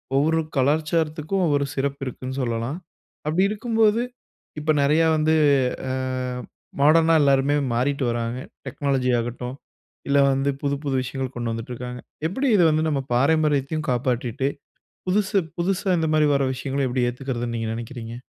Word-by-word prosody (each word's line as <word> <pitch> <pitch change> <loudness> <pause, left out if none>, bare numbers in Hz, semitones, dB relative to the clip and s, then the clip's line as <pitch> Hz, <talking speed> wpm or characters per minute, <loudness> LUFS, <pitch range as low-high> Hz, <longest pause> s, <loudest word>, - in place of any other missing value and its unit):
ஒவ்வொரு 160 +4 +3 0.2
கலாச்சாரத்துக்கும் 155 +5 +1
ஒவ்வொரு 145 -2 +2
சிறப்பு 140 0 -2
இருக்குன்னு 130 +1 -5
சொல்லலாம். 120 +5 -2 0.5
அப்படி 160 +5 +2
இருக்கும்போது, 220 0 +2 0.6
இப்ப 155 +1 +1
நிறையா 155 +4 +4
வந்து 155 +1 +2 0.6
அ - - -1 0.9
மாடர்னா 160 +2 +5
எல்லோருமே 140 0 +3 0.2
மாறிட்டு 135 +3 0
வராங்க. 115 +1 -2 0.3
டெக்னாலஜி 130 -2 0
ஆகட்டும் 125 +2 -4 0.5
இல்ல 140 - +4
வந்து 135 +1 +1
புது 140 0 +1
புது 135 -1 0
விஷயங்கள் 130 0 -4
கொண்டு 120 -1 -2
வந்துட்டு 115 +2 -5
இருக்காங்க. 125 0 -6 0.3
எப்படி 265 +10 -1
இதை 180 -4 +5
வந்து 155 +1 +1
நம்ம 140 -3 0
பாரம்பரியத்தையும் 150 +2 +1
காப்பாற்றிட்டு, 125 +2 0 0.6
புதுசு 200 +1 +2 0.2
புதுசா 190 +2 0
இந்த 160 - 0
மாதிரி 150 -1 +4
வர 140 -1 +2
விஷயங்கள 135 +1 -2
எப்படி 125 0 +1
ஏற்றுக்கிறதுன்னு 120 -2 -4
நீங்க 115 -1 -2
நினைக்கீறீங்க? 115 0 -7
140 Hz, 140 wpm, -23 LUFS, 125-155 Hz, 0.9 s, மாடர்னா